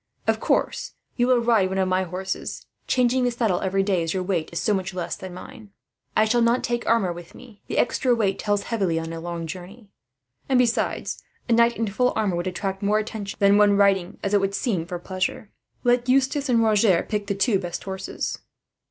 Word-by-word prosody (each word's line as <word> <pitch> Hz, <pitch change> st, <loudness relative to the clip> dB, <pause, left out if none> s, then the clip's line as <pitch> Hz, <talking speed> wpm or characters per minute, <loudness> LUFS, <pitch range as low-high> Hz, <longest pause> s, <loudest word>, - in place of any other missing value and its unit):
Of -, -, +1 dB
course, -, -, 0 dB, 0.2 s
you 245 Hz, 0 st, +2 dB
will 250 Hz, -2 st, +4 dB
ride 225 Hz, -5 st, +3 dB
one 190 Hz, -, -3 dB
of 190 Hz, -1 st, +2 dB
my 185 Hz, 0 st, +1 dB
horses; 185 Hz, +1 st, -5 dB, 0.2 s
changing 250 Hz, 0 st, +2 dB
the 245 Hz, -, +3 dB
saddle 230 Hz, -6 st, 0 dB
every 195 Hz, +1 st, +1 dB
day, 190 Hz, -3 st, +1 dB
as 165 Hz, +2 st, -2 dB
your 185 Hz, -, -1 dB
weight 180 Hz, -4 st, -1 dB
is 170 Hz, -, -3 dB
so 210 Hz, -, +1 dB
much 190 Hz, -1 st, -2 dB
less 175 Hz, -2 st, -3 dB
than 185 Hz, -1 st, -8 dB
mine. 215 Hz, +5 st, -11 dB, 0.5 s
"I 215 Hz, -, +5 dB
shall 235 Hz, +2 st, +2 dB
not 235 Hz, +2 st, +2 dB
take 240 Hz, 0 st, -2 dB
armour 215 Hz, -6 st, +2 dB
with 175 Hz, 0 st, -11 dB
me. 225 Hz, -5 st, -15 dB
The -, -, -3 dB
extra 245 Hz, 0 st, +2 dB
weight 205 Hz, -4 st, 0 dB
tells 205 Hz, -1 st, 0 dB
heavily, 195 Hz, -8 st, -1 dB
on 165 Hz, 0 st, -4 dB
a 165 Hz, -, -5 dB
long 170 Hz, 0 st, -5 dB
journey; 190 Hz, +6 st, -9 dB, 0.6 s
and 265 Hz, -, +4 dB
besides, 245 Hz, -1 st, 0 dB, 0.3 s
a 240 Hz, -, +2 dB
knight 235 Hz, +1 st, +4 dB
in 225 Hz, -, 0 dB
full 250 Hz, +5 st, +1 dB
armour 205 Hz, -5 st, 0 dB
would 175 Hz, +2 st, -2 dB
attract 190 Hz, +1 st, -3 dB
more 210 Hz, +1 st, +2 dB
attention 215 Hz, -2 st, -4 dB
than 200 Hz, +1 st, +5 dB
one 205 Hz, -1 st, +5 dB
riding, 195 Hz, -2 st, +2 dB
as 200 Hz, -, -1 dB
it 205 Hz, -, +4 dB
would 195 Hz, 0 st, -1 dB
seem, 185 Hz, -10 st, -1 dB
for 180 Hz, -1 st, -4 dB
pleasure. 185 Hz, +3 st, -3 dB, 0.3 s
"Let 245 Hz, 0 st, +2 dB
Eustace 270 Hz, +2 st, +2 dB
and 230 Hz, -2 st, +4 dB
Roger 210 Hz, -5 st, +3 dB
pick 210 Hz, -2 st, -2 dB
the 200 Hz, -, -1 dB
two 200 Hz, 0 st, +2 dB
best 175 Hz, -2 st, -5 dB
horses." 190 Hz, -1 st, -4 dB
200 Hz, 215 wpm, -24 LUFS, 185-230 Hz, 0.6 s, I